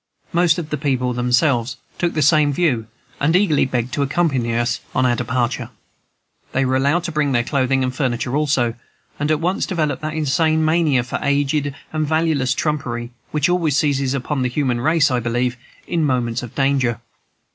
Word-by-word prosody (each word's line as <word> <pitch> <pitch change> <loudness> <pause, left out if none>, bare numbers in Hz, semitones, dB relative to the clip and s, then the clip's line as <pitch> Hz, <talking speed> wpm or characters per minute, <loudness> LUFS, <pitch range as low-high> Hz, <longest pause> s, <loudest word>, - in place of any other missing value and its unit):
Most 170 -1 +3
of 160 -3 -5
the 150 - -2
people 130 -4 0
themselves 125 0 +1 0.2
took 175 -1 0
the 155 - +2
same 150 0 +4
view, 135 -8 0 0.3
and 155 +4 +2
eagerly 180 -8 +3
begged 125 -1 -2
to 145 - -1
accompany 140 -5 0
us 120 +1 0 0.2
on 130 - +3
our 120 -1 +3
departure. 120 +1 -2 0.8
They 135 +1 +1
were 130 0 +1
allowed 140 +6 +2
to 175 - -3
bring 150 -3 0
their 120 -1 +2
clothing 130 0 +1
and 130 0 -1
furniture 125 -1 -1
also, 135 -6 +1 0.5
and 145 +1 -1
at 155 -1 +2
once 180 +4 -1
developed 155 -7 -1
that 155 0 -4
insane 155 +1 +1
mania 155 -6 +2
for 125 - -4
aged 145 0 0 0.2
and 155 -1 0
valueless 155 -5 +1
trumpery 120 -6 -2 0.2
which 150 -1 +1
always 170 -5 +1
seizes 140 -3 +1
upon 140 +1 -2
the 125 - +1
human 125 -2 -1
race, 155 0 +3
I 125 - +1
believe, 120 +1 -1 0.3
in 170 -2 -1
moments 125 -4 0
of 120 -3 -9
danger. 135 -4 +1
140 Hz, 180 wpm, -20 LUFS, 125-155 Hz, 0.8 s, same